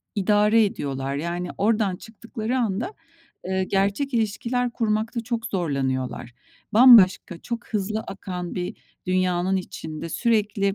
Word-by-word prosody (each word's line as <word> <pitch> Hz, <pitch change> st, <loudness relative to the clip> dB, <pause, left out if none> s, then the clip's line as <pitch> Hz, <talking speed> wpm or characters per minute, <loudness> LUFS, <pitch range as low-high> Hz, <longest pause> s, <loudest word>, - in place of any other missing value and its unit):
idare 210 Hz, +2 st, +4 dB
ediyorlar. 135 Hz, -7 st, -3 dB
Yani, 175 Hz, +4 st, -3 dB
oradan 210 Hz, -2 st, +1 dB
çıktıkları 225 Hz, +4 st, -5 dB
anda, 230 Hz, -, -1 dB, 0.6 s
ııı, 190 Hz, 0 st, 0 dB
gerçek 200 Hz, +8 st, 0 dB
ilişkiler 235 Hz, +3 st, 0 dB
kurmakta 225 Hz, +1 st, -1 dB
çok 230 Hz, 0 st, -3 dB
zorlanıyorlar. 135 Hz, -, -2 dB, 0.4 s
Bambaşka, 215 Hz, -7 st, +7 dB
çok 235 Hz, +5 st, -6 dB
hızlı 215 Hz, 0 st, -2 dB
akan 180 Hz, -4 st, -6 dB
bir 180 Hz, -1 st, -4 dB, 0.3 s
dünyanın 185 Hz, 0 st, +1 dB
içinde 160 Hz, -3 st, -6 dB
sürekli 205 Hz, -1 st, +1 dB
200 Hz, 110 wpm, -24 LUFS, 180-225 Hz, 0.6 s, Bambaşka